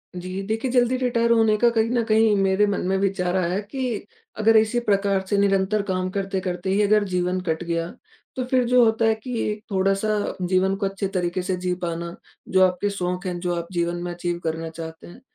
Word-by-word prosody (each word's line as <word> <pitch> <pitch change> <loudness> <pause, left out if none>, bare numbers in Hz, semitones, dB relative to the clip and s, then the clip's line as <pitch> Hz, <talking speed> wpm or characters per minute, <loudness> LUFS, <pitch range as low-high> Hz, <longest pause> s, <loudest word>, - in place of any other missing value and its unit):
जी 185 +2 -5
देखिए, 225 +5 -2
ज़ल्दी 250 0 +3
रिटायर 235 -2 +1
होने 225 -2 +4
का 240 +2 +4
कहीं 230 -1 +1
न 240 -1 +1
कहीं 220 -1 +3
मेरे 195 +1 +3
मन 200 - -1
में 190 - +1
विचार 190 -2 0
आया 180 +2 0
कि, 240 +2 -4 0.3
अगर 220 +1 +5
इसी 220 +2 +2
प्रकार 200 -3 +1
से 205 - +1
निरंतर 200 +1 +2
काम 185 0 -1
करते-करते 190 -2 -3
ही 195 +2 +2
अगर 210 0 +4
जीवन 180 -1 -1
कट 160 +1 -1
गया, 170 -1 -2 0.5
तो 255 - -2
फिर 255 0 +2
जो 250 0 +5
होता 225 0 +2
है 220 0 +3
कि 235 +1 -5
एक 210 0 -6
थोड़ा-सा 195 +2 0
जीवन 185 +1 +1
को 195 - -2
अच्छे 195 0 -2
तरीके 185 -1 -2
से 185 0 -1
जी 180 0 -1
पाना, 170 0 -4 0.3
जो 190 0 +2
आपके 185 +3 -2
शौक़ 180 -1 -3
हैं, 175 -1 -3
जो 175 -1 -1
आप 170 0 -4
जीवन 170 -1 -1
में 175 - -4
अचीव 175 0 -3
करना 160 0 -3
चाहते 160 0 -9
हैं, 235 +9 -14
195 Hz, 210 wpm, -23 LUFS, 180-220 Hz, 0.5 s, अगर